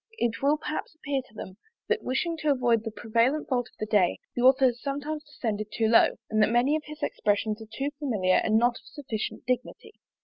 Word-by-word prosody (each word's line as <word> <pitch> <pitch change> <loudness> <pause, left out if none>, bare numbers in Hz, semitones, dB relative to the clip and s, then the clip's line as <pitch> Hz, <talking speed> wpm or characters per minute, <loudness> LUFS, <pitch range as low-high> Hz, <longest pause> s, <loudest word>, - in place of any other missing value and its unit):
It 235 - -1
will 285 +2 +3
perhaps 310 0 -5
appear 280 -3 -2
to - - -24
them, 190 -2 -8 0.3
that 450 0 +1
wishing 330 +6 -1
to 305 -1 -1
avoid 240 -5 +2
the 225 - -3
prevalent 235 +7 0
fault 245 -3 0
of - - -31
the 215 - -2
day, 205 -5 +2 0.2
the 245 - -1
author 260 +1 +6
has 245 -1 +1
sometimes 290 +2 -3
descended 220 -8 -4
too 225 0 +1
low, 225 +1 +5
and 215 0 +1
that 210 - +4
many 245 +6 +3
of 310 - -1
his 305 0 -9
expressions 210 +1 0
are 220 - -9
too 275 +1 -2
familiar, 210 -11 +2
and 220 0 +3
not 240 +1 +2
of - - -25
sufficient 235 -7 -5
dignity. 255 - -3
245 Hz, 215 wpm, -27 LUFS, 220-290 Hz, 0.3 s, author